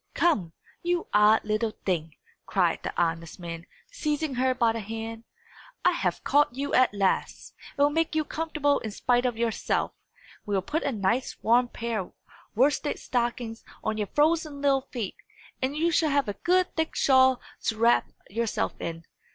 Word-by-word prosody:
"Come, 200 - +2 0.3
you 350 0 0
odd 210 +2 +5
little 215 +1 -1
thing!" 165 -4 -1 0.3
cried - - +1
the - - -3
honest 165 0 -1
man, 170 -1 -7 0.2
seizing 305 - -1
her 255 +1 +1
by 235 -2 +3
the 230 - -3
hand, 225 +2 -6 0.6
"I - - +6
have - - -1
caught 290 -4 +3
you 280 +2 -3
at 255 0 +5
last, 200 -2 -1 0.2
and 285 - +4
will 290 - +4
make 325 +1 0
you 310 -1 +1
comfortable 305 -3 0
in 220 - -5
spite 245 +4 +1
of 240 -2 -3
yourself. 230 -1 0 0.5
We 205 - -2
will 190 - 0
put 305 - -1
a 280 - -1
nice 225 +3 -1
warm 245 +2 +4
pair 235 -2 -3
of 185 - -7 0.4
worsted 280 +5 +2
stockings 240 -2 -2 0.2
on 220 0 -1
your 210 - -1
frozen 305 - +1
little 275 -2 +2
feet, 225 -7 -4 0.4
and 265 +3 -1
you 335 +2 +2
shall 320 -1 +3
have 280 -2 +2
a 205 - -2
good 365 - +1
thick 320 0 -1
shawl 260 -1 +5 0.3
to 220 - 0
wrap 230 +2 +3 0.2
yourself 230 +2 -1
in. 165 0 -5
240 Hz, 175 wpm, -27 LUFS, 215-290 Hz, 0.6 s, I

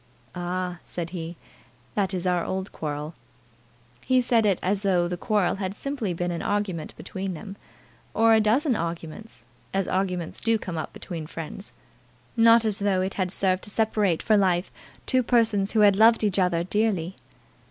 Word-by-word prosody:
"Ah!" 180 0 -3
said 170 -1 -5
he, 170 -1 -6 0.6
"that 195 -2 0
is 185 -2 -3
our 180 -2 +1
old 190 +1 -4
quarrel." 150 +1 -5 0.9
He 255 0 +3
said 235 -3 +2
it 195 -3 +2
as 195 +2 +1
though 180 -4 +2
the 180 - -3
quarrel 195 +1 0
had 190 0 -3
simply 270 -6 -3
been 175 +1 -2
an 170 - -3
argument 200 -6 -2
between 190 -1 -5
them, 195 +4 -8 0.6
or 225 0 +5
a 220 - +5
dozen 245 +6 +2
arguments, 170 +5 -6 0.3
as 195 -2 0
arguments 180 -3 -2
do 225 -1 +2
come 185 -5 -6
up 160 - -4
between 165 -3 -7
friends; 165 +6 -7 0.6
not 230 0 +6
as 215 -1 +1
though 200 -2 +1
it 190 +1 -2
had 185 -2 -1
served 185 -1 +1
to - - -4
separate 210 -5 +1
for 215 - +4
life 185 -2 +1 0.3
two 255 -1 +3
persons 225 -5 +2
who 220 - +3
had 205 -2 +6
loved 225 +2 +5
each 205 -2 +2
other 175 -2 +2
dearly. 190 -2 0
190 Hz, 175 wpm, -25 LUFS, 175-215 Hz, 0.9 s, not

